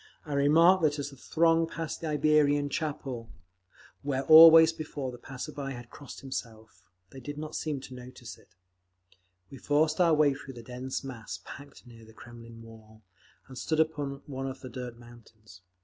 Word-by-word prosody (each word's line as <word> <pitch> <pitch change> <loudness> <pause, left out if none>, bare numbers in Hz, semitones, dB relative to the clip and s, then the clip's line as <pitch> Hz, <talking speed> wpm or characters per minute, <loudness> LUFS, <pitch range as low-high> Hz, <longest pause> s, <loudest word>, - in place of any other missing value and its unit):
I 150 - -5
remarked 165 +6 +5
that 150 -2 +1
as 145 0 -5
the - - -13
throng 165 +4 +2
passed 165 -1 -6
the 165 - -4
Iberian 150 -1 +2
Chapel, 140 -6 -4 0.7
where 135 -1 -2
always 160 +2 +9
before 145 -4 -6
the 120 - -11
passerby 135 +2 -7
had 120 -1 -11
crossed 145 - -11
himself, 110 -7 -8 0.3
they 135 - -10
did 145 +3 -8
not 155 0 -6
seem 150 -4 -3
to 130 - -11
notice 125 -1 -10
it…. 95 - -25 1.0
We 135 - -10
forced 155 +3 +1
our 165 -3 +4
way 150 -2 +3
through 135 -1 -10
the 120 - -10
dense 125 +3 -6
mass 125 -5 -8
packed 140 0 -12
near 115 -2 -15
the 110 0 -16
Kremlin 115 -1 -13
wall, 110 -1 -16 0.4
and 130 - -12
stood 160 -1 -1
upon 145 -3 -1
one 135 -1 -5
of 135 0 -7
the 130 - -8
dirt 125 -1 -7
mountains. 110 -5 -17
135 Hz, 175 wpm, -28 LUFS, 120-150 Hz, 1.0 s, always